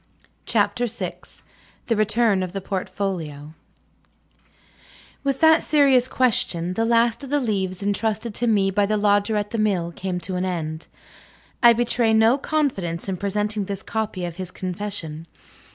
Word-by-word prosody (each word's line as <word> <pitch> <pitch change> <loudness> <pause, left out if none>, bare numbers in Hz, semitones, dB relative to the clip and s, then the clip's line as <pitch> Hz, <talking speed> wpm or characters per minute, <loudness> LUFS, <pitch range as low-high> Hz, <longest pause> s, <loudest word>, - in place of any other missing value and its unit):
CHAPTER 245 0 +1
VI 230 - -4 0.7
THE 230 - +1
RETURN 215 -1 +2
OF 185 -1 -4
THE 195 - -4
PORTFOLIO 180 -6 -4 1.7
With 275 -1 -1
that 320 0 +6
serious 275 -4 +4
question 185 -9 0
the 225 +4 0
last 235 +1 +2
of 275 - -7
the 290 +1 +2
leaves 195 -6 -2
entrusted 215 +2 -1
to 240 +3 0
me 200 -3 +3
by 200 +1 +2
the 215 +1 +1
Lodger 205 +1 +2
at 205 0 -2
the 230 - -2
Mill 185 -5 0
came 180 +1 -4
to 185 +1 -4
an 180 - -1
end. 160 -3 -4 0.7
I 235 -1 +8
betray 235 -1 +1
no 225 +5 +4
confidence 200 - -1
in 190 -1 -2
presenting 210 +2 -1
this 195 0 -5
copy 210 -4 -3
of 170 -1 -6
his 185 -2 -5
confession. 180 -4 -5
205 Hz, 150 wpm, -23 LUFS, 185-230 Hz, 1.7 s, I